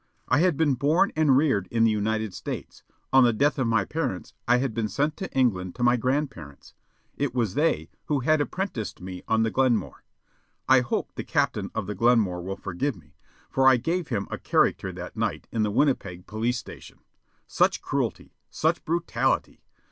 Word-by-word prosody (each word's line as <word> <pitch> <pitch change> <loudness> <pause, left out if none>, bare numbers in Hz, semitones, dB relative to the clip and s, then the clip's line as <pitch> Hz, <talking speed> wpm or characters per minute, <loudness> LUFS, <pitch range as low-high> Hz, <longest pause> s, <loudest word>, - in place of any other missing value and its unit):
I 135 - +3
had 175 -3 +2
been 155 -4 +3
born 150 +9 +2
and 150 -4 +4
reared 130 -11 +2
in 115 -1 +2
the 115 - +4
United 110 -1 -1
States. - - -7 0.3
On 135 0 +7
the 120 - +5
death 140 +6 +1
of 130 - +1
my 110 -4 +2
parents, 150 - -3
I 120 +1 +5
had 130 -2 -1
been 110 -1 -1
sent 145 +9 -1
to 190 - -5
England 95 -9 0
to 120 - -3
my 120 0 +5
grandparents. 125 - -3 0.4
It 140 -3 -2
was 115 -6 0
they 145 - 0
who 145 -3 0
had 155 +3 +3
apprenticed 145 - -3
me 90 0 -7
on 110 0 +2
the 115 - 0
Glenmore. 130 -3 0 0.6
I 130 0 +7
hope 125 - -2
the - - -5
captain - - 0
of - - -2
the 105 - -4
Glenmore 105 -5 +2
will 95 +2 -5
forgive 120 +9 -2
me, 75 -5 -19 0.3
for 135 0 +2
I 130 -1 +7
gave 165 +6 -2
him 100 -6 -2
a - - -4
character - - +1
that - - -8
night - - -2
in 115 - -1
the 105 - +1
Winnipeg 100 -7 0
police 115 +3 -1
station. - - -11 0.4
Such - - +1
cruelty! - - -3 0.2
Such - - 0
brutality! 170 +1 -1
120 Hz, 185 wpm, -26 LUFS, 105-145 Hz, 0.6 s, On